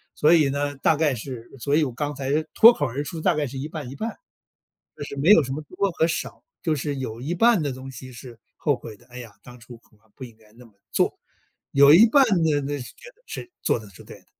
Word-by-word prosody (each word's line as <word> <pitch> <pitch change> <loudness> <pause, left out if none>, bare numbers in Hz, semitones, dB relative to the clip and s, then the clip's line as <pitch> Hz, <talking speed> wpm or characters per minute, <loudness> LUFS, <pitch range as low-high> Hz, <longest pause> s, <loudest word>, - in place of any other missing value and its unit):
所 155 +3 +4
以 155 -5 +4
呢， 145 +1 -2
大 155 - +2
概 150 -4 +1
是 120 0 -8
所 140 +4 0
以 160 - +3
我 130 - -4
刚 145 +3 -4
才 140 +4 -1
脱 230 +2 +9
口 145 -9 -2
而 130 +4 -4
出， 160 +1 -7
大 - - +2
概 150 - -1
是 135 +2 -8
一 135 +3 -4
半 150 -6 -7
一 135 - -9
半。 225 +9 -5 0.8
就 - - -6
是 - - -8
没 145 +6 +1
有 165 -7 +7
什 135 0 -5
么 150 - -5
多 195 +6 -2
和 165 0 +1
少， 170 - -5 0.2
就 160 -3 0
是 145 0 -4
有 120 -3 -6
一 155 +6 -3
半 230 -1 +4
的 140 - -2
东 130 +1 -9
西 130 +1 -11
是 120 0 -12 0.2
后 145 -3 +1
悔 110 -3 -11
的： 120 - -23
“哎 125 0 -11
呀， 115 -4 -11
当 125 0 -13
初 120 0 -13
恐 110 - -28
怕 110 - -32
不 - - -10
应 115 -3 -15
该 110 -1 -24
那 120 +2 -16
么 115 - -21 0.2
做。” - - 0 0.5
有 140 +1 +7
一 205 +8 +8
半 275 +5 +5 0.2
的 155 -2 +2
那 145 +1 -3
是 125 - -9
觉 - - -14
得 485 - -34
是 365 - -8
做 - - +1
得 105 -2 -13
是 95 - -15
对 - - -12
的。 - - -29
140 Hz, 290 characters per minute, -23 LUFS, 125-155 Hz, 0.8 s, 脱